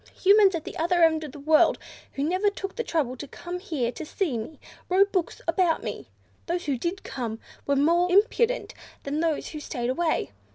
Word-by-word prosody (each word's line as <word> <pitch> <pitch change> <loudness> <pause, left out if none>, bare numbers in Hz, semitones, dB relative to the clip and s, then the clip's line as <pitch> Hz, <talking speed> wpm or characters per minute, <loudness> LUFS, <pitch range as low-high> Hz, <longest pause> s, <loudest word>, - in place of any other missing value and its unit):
Humans 395 -1 +6
at 325 - -4
the - - -8
other 345 +1 +2
end 320 -1 +4
of 300 - -7
the 290 - -11
world, 310 +2 +4 0.4
who, 275 - -2
never 370 +6 +2
took 390 -1 -6
the 470 - -2
trouble 290 - -1
to 290 - -7
come 350 +5 -7
here 300 - -2
to 320 - -7
see 315 -2 -2
me, 230 +7 -6 0.3
wrote 395 +2 +4
books 365 -4 -1
about 330 0 +2
me. 205 - -5 0.4
Those 350 +1 -2
who 285 -2 0
did 345 +10 -3
come 230 -4 -4 0.3
were 280 - +2
more 340 +6 +3
impudent 450 +5 +2 0.3
than 285 +2 -2
those 320 -2 0
who 305 - -7
stayed 250 -4 -3
away. 320 - 0
325 Hz, 200 wpm, -26 LUFS, 280-365 Hz, 0.4 s, Humans